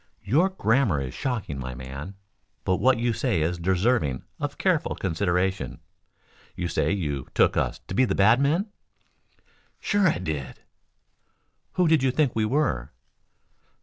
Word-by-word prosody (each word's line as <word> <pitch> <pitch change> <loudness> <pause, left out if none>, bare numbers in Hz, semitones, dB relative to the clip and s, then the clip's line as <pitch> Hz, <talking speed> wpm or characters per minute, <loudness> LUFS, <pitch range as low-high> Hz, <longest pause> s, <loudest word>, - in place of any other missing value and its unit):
"Your 150 - +3
grammar 115 - +2
is 65 -2 -4
shocking, 115 - -3
my 65 -1 -5
man, 70 +8 -8 0.5
but 95 - +2
what 130 -1 +3
you 120 0 0
say 110 - 0
is 85 +2 -1
deserving 90 - +1 0.2
of - - -4
careful - - +1
consideration. 95 +1 -1 0.8
You 85 -1 -3
say - - 0
you 75 -9 -2
took - - +4
us - - -1
to - - -5
be 130 +6 +3
bad 110 +6 +4
men?" 170 +9 +1 1.1
"Sure 205 -2 +2
I 155 - +2
did." 75 -7 -5 1.1
"Who 180 -2 +2
did 160 -3 +4
you 135 - +2
think 135 -1 +1
we 110 -1 +1
were?" 110 - 0
100 Hz, 145 wpm, -25 LUFS, 80-130 Hz, 1.1 s, took